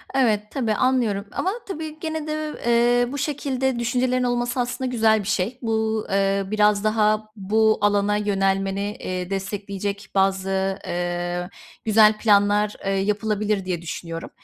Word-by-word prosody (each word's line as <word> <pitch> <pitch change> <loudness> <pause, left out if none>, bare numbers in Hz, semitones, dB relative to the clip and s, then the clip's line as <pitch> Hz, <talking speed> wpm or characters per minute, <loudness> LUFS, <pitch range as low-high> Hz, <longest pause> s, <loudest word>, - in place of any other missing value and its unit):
Evet, 225 -6 +3
tabii, 235 -6 0
anlıyorum 225 -4 +1
ama, 375 - -1 0.2
tabii, 315 -4 -6
gene 315 -1 -4
de, 305 0 -3
eee, 240 +1 +3
bu 285 - -4
şekilde 265 -3 -1
düşüncelerin 250 +1 +1
olması 245 0 -1
aslında 250 +1 -2
güzel 220 -2 +3
bir - - -7
şey. 215 +4 -1
Bu, 220 -2 0
eee, 195 0 +2
biraz 210 -1 +3
daha 215 0 +1
bu 215 +2 +2
alana 205 0 +2
yönelmeni, 195 0 0
eee, 180 -1 -4
destekleyecek 200 0 -4
bazı, 195 0 +1
ııı, 175 0 -2 0.4
güzel 215 0 +5
planlar, 205 -1 +3
ııı, 195 - +1
yapılabilir 210 0 0
diye 180 -2 -2
düşünüyorum. 165 0 -6
210 Hz, 135 wpm, -23 LUFS, 195-240 Hz, 0.4 s, güzel